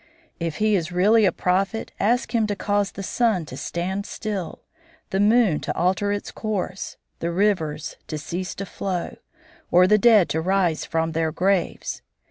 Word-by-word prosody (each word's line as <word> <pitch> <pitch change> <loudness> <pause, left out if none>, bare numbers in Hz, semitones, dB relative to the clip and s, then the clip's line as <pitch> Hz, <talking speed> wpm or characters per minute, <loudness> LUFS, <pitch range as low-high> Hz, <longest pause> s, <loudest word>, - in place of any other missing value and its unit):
If 165 -3 -2
he 215 +2 +2
is 170 -2 -1
really 210 +5 +4
a 185 - +4
prophet, 195 +6 -1
ask 240 +6 +1
him 225 -2 +2
to 205 - -1
cause 205 -1 0
the 195 - -6
sun 215 -5 +1
to 130 - -9
stand 185 +7 -3
still, 200 -5 -5 0.5
the 190 - 0
moon 210 -5 +4
to - - -4
alter 185 +4 +1
its 205 0 -3
course, 195 -3 -4 0.2
the 170 - -2
rivers 170 -5 0
to 155 - -4
cease 175 +5 -4
to 195 - -5
flow, 185 -2 -4 0.5
or 180 +1 +6
the 210 +3 +4
dead 220 -5 +6
to 160 - 0
rise 180 -2 +1
from 165 0 -1
their 160 0 0
graves. 185 +2 0
190 Hz, 170 wpm, -23 LUFS, 170-205 Hz, 0.5 s, or